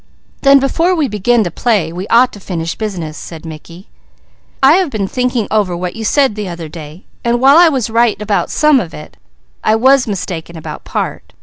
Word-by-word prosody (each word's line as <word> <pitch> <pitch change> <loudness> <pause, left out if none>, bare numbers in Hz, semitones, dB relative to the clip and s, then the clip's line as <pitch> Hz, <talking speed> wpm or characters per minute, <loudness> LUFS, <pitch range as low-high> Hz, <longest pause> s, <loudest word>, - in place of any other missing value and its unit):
"Then 275 0 +6
before 330 +7 +1
we 310 -4 0
begin 220 +2 +1
to 175 - -4
play 200 -7 0
we 185 +3 -5
ought 245 +2 +4
to 205 - -10
finish 165 -4 -4
business," 180 -8 -5
said 165 -1 -10
Mickey. 165 +3 -11 0.8
"I 285 +6 +7
have 375 -4 0
been 210 -6 -2
thinking 250 -1 -1
over 200 -5 0
what 180 0 -4
you 225 - -6
said 270 +2 +2
the 210 -1 -5
other 170 -2 -7
day, 155 +2 -11 0.2
and 240 0 +1
while 270 +4 +6
I 345 -1 +7
was 265 -7 -1
right 230 -2 +2
about 210 -1 -1
some 300 -2 +3
of 175 -8 -6
it, 150 - -11 0.5
I 215 - +3
was 260 +3 +3
mistaken 170 -4 -5
about 160 - -8
part. - - -4
215 Hz, 200 wpm, -15 LUFS, 175-255 Hz, 0.8 s, I